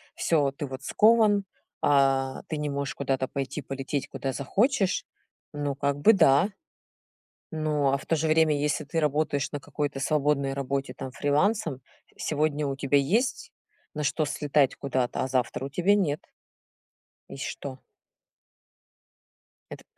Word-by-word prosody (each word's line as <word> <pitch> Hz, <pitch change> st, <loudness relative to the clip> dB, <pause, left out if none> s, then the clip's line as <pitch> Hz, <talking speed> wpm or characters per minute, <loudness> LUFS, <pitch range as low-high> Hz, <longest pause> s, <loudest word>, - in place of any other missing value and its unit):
всё, 145 Hz, -4 st, +2 dB
ты 145 Hz, +2 st, -5 dB
вот 135 Hz, 0 st, -8 dB
скован, 215 Hz, +2 st, +4 dB, 0.4 s
а, 135 Hz, -2 st, +2 dB
ты 155 Hz, -, -3 dB
не 150 Hz, 0 st, -2 dB
можешь 140 Hz, 0 st, -3 dB
куда-то 135 Hz, -1 st, -1 dB
пойти, 135 Hz, +3 st, -4 dB
полететь 135 Hz, 0 st, -4 dB
куда 135 Hz, -1 st, -4 dB
захочешь, 200 Hz, -, +1 dB, 0.5 s
ну, 145 Hz, -1 st, -2 dB
как 140 Hz, 0 st, -1 dB
бы 220 Hz, +10 st, +6 dB
да. 145 Hz, -2 st, +5 dB, 1.0 s
Но, 150 Hz, -3 st, +1 dB
а 140 Hz, -, +1 dB
в -, -, -13 dB
то -, -, +1 dB
же 160 Hz, 0 st, 0 dB
время, 155 Hz, -1 st, +4 dB
если 150 Hz, +1 st, 0 dB
ты 165 Hz, +3 st, -1 dB
работаешь 145 Hz, -2 st, 0 dB
на 145 Hz, -, -4 dB
какой-то 145 Hz, 0 st, -3 dB
свободной 140 Hz, -1 st, +1 dB
работе, 135 Hz, -1 st, -3 dB
там, 130 Hz, -, -6 dB
фрилансом, 145 Hz, -, 0 dB, 0.4 s
сегодня 150 Hz, -1 st, 0 dB
у 135 Hz, -, -3 dB
тебя 140 Hz, +1 st, +2 dB
есть 220 Hz, -, 0 dB, 0.4 s
на 150 Hz, -1 st, -3 dB
что 155 Hz, +2 st, +1 dB
слетать 145 Hz, -1 st, +1 dB
куда-то, 130 Hz, -3 st, -1 dB
а -, -, -3 dB
завтра 130 Hz, 0 st, -1 dB
у -, -, -3 dB
тебя 180 Hz, +8 st, +2 dB
нет. 155 Hz, -7 st, 0 dB, 1.1 s
И -, -, -8 dB
что? 135 Hz, -1 st, -6 dB, 1.9 s
Это -, -, -9 dB
145 Hz, 145 wpm, -27 LUFS, 135-155 Hz, 1.9 s, бы